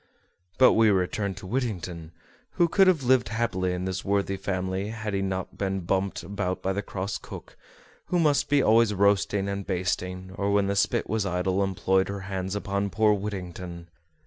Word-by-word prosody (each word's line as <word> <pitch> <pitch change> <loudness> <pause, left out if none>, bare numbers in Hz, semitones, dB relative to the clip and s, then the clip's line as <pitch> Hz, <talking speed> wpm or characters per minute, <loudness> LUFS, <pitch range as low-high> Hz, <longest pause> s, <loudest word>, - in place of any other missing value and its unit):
But 130 - +7
we 110 -1 +5
return 95 +1 0
to 95 +2 -10
Whittington, 90 -8 -3 0.4
who 175 - +3
could 195 +3 +4
have 170 -7 +3
lived 125 0 +3
happy 100 -5 -1
in 90 +1 -3
this 95 0 -3
worthy 100 0 0
family 95 0 -2
had 110 -1 -4
he 100 - 0
not 95 -1 -4
been 95 -1 -1
bumped 95 +2 -1
about 95 -2 -3
by 95 - 0
the 100 - -2
cross 100 0 -4
cook, - - -10 0.5
who 180 - 0
must 150 -4 +2
be 145 -1 +4
always 110 -1 +4
roasting 100 0 +2
and 100 0 -3
basting, 90 0 -3
or 100 0 0
when 100 0 +3
the 100 0 -1
spit 100 - +1
was 110 -3 -1
idle 95 +1 0
employed 95 0 +1
her 100 0 -4
hands 95 0 -4
upon 100 -1 -1
poor 110 +1 +3
Whittington! 90 -4 -6
100 Hz, 180 wpm, -26 LUFS, 95-105 Hz, 0.5 s, But